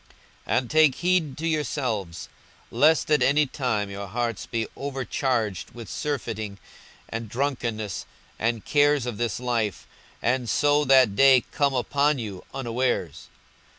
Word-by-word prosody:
42:021:034 - - +2
And 125 -2 -8
take 155 -3 +5
heed 175 -5 0
to 165 +1 -2
yourselves, 115 - -2 0.4
lest 155 +1 +3
at 150 - +4
any 150 +2 +4
time 115 -7 -2
your 100 0 -6
hearts 115 +1 -3
be 115 -1 -2
overcharged 130 -7 -2
with 115 -3 -8
surfeiting, 110 -8 -4 0.5
and 115 -1 -5
drunkenness, 115 -6 -3 0.3
and 115 -1 -1
cares 145 -2 +3
of 120 -4 -5
this 120 -2 -1
life, 115 -5 -1 0.3
and 120 0 0
so 145 +3 +3
that 130 -6 +5
day 135 0 +6
come 140 -2 +1
upon 140 +3 +1
you 105 -6 -6
unawares. 120 - -2
125 Hz, 135 wpm, -25 LUFS, 110-145 Hz, 0.5 s, day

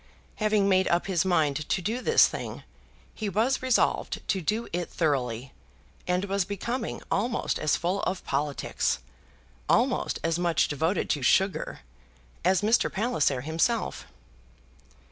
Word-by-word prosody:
Having 215 -2 +2
made 190 -1 +3
up 170 0 +1
his 180 -3 +1
mind 155 -5 +1
to 195 - +1
do 220 +8 -2
this 460 - +6
thing, - - -6 0.5
he 215 -2 -3
was 230 +7 +1
resolved 255 -2 +1
to 190 - +1
do 215 +7 -1
it 175 0 -2
thoroughly, 130 -6 -1 0.5
and 180 +2 +1
was 200 -1 0
becoming 225 +5 -4
almost 235 +4 0
as 155 - +2
full 180 +4 -1
of 185 0 -3
politics, 140 +1 -1 0.7
almost - - +2
as 165 +1 0
much 175 -2 +2
devoted 160 +6 0
to 145 - 0
sugar, 190 +9 +1 0.6
as 185 +2 +3
Mr. 220 +3 +3
Palliser 190 - 0
himself. 165 - -1
185 Hz, 135 wpm, -27 LUFS, 160-215 Hz, 0.7 s, this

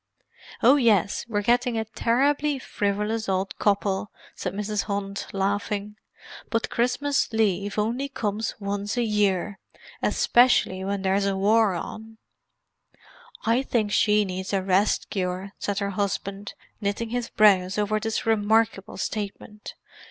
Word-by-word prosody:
"Oh 260 +5 +7
yes; 210 - +2
we're 205 -2 -1
getting 240 +1 +2
a 220 - -1
terribly 280 +6 +1
frivolous 210 -1 -2
old 190 +1 -1
couple," 200 -1 +1 0.2
said 180 - -4
Mrs. 210 +1 -2
Hunt, 200 -1 -4
laughing. 205 +1 -2 0.5
"But 230 -1 -1
Christmas 250 +4 0
leave 205 -3 0
only 235 +6 -1
comes 215 -4 -3
once 205 +2 -3
a 240 - +2
year, 205 -2 0 0.4
especially 240 -6 +3
when 195 0 -2
there's 195 +1 +1
a 195 -1 0
war 210 0 +3
on!" 220 +5 -7 1.3
"I 230 +3 +3
think 225 -6 -1
she 210 0 +3
needs 190 +1 -5
a 195 -1 +1
rest 195 +2 +2
cure!" 185 0 -3
said 205 -1 -2
her 200 -1 -1
husband, 200 0 -3 0.3
knitting 205 +3 -2
his 245 0 -3
brows 195 -3 +4
over 210 +1 +1
this 225 +1 -2
remarkable 220 -2 +1
statement. 210 0 -5
210 Hz, 130 wpm, -25 LUFS, 195-225 Hz, 1.3 s, Oh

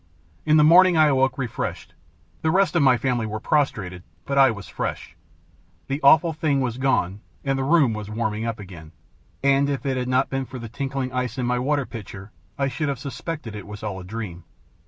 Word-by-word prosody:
In 155 0 +5
the 150 - +6
morning 175 +2 +7
I 155 -1 +6
awoke 135 -1 +2
refreshed. 125 -4 -4 0.5
The 160 - +1
rest 190 +2 +2
of 170 - +4
my 130 -3 +5
family 120 -2 -1
were 110 0 -4
prostrated, 100 -11 -1 0.2
but 140 - -2
I 135 -1 +6
was 100 -4 -6
fresh. - - -5 0.7
The 140 +2 -3
Awful 160 +4 +5
Thing 150 -3 0
was 125 -2 -2
gone, 105 -8 +1 0.3
and 135 - +1
the - - 0
room 140 -4 +3
was 105 -1 -6
warming 110 0 -2
up 115 -1 -3
again; 85 -6 -11 0.5
and 140 0 +3
if 140 -1 -3
it 135 -2 0
had 125 0 -2
not 130 +1 +1
been 135 0 -1
for 130 +1 -9
the 115 -2 -7
tinkling 135 +1 -3
ice 125 0 -2
in 125 - -1
my 125 0 0
water 140 +1 0
pitcher, 105 -3 -9 0.3
I 140 - +1
should 150 +2 -2
have 140 - -2
suspected 140 -2 -6
it 105 -2 -8
was 105 0 -9
all 100 -3 -4
a - - -9
dream. 90 -3 -6
130 Hz, 210 wpm, -23 LUFS, 110-140 Hz, 0.7 s, morning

